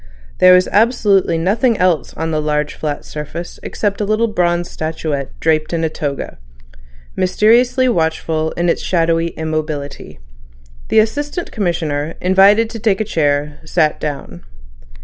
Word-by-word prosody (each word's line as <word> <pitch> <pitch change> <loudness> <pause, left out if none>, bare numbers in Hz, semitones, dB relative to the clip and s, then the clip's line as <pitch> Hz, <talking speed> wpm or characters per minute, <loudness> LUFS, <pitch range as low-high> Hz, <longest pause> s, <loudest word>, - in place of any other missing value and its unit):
There 185 0 +7
was 180 0 +3
absolutely 205 -5 +3
nothing 215 +7 +1
else 180 -3 +1
on 160 +1 -3
the 155 -1 0
large 150 -1 -1
flat 150 -2 -4
surface 150 +3 -7
except 205 -1 -2
a - - +1
little 215 +3 +1
bronze 175 -4 0
statuette 155 -3 -4
draped 155 0 0
in 165 -1 -1
a 160 - +1
toga, 145 - -5 0.8
mysteriously 240 +7 +3
watchful 160 -5 0
in 175 +1 -1
its 170 - +1
shadowy 165 -1 +1
immobility. 155 -3 -5 0.7
The - - 0
Assistant 290 +10 0
Commissioner, 165 -6 -2
invited 195 +4 +4
to 230 - -6
take 205 -3 +1
a 220 - -1
chair, 145 -4 -1
sat 155 -1 +1
down. 140 - -6
170 Hz, 140 wpm, -17 LUFS, 155-205 Hz, 0.8 s, There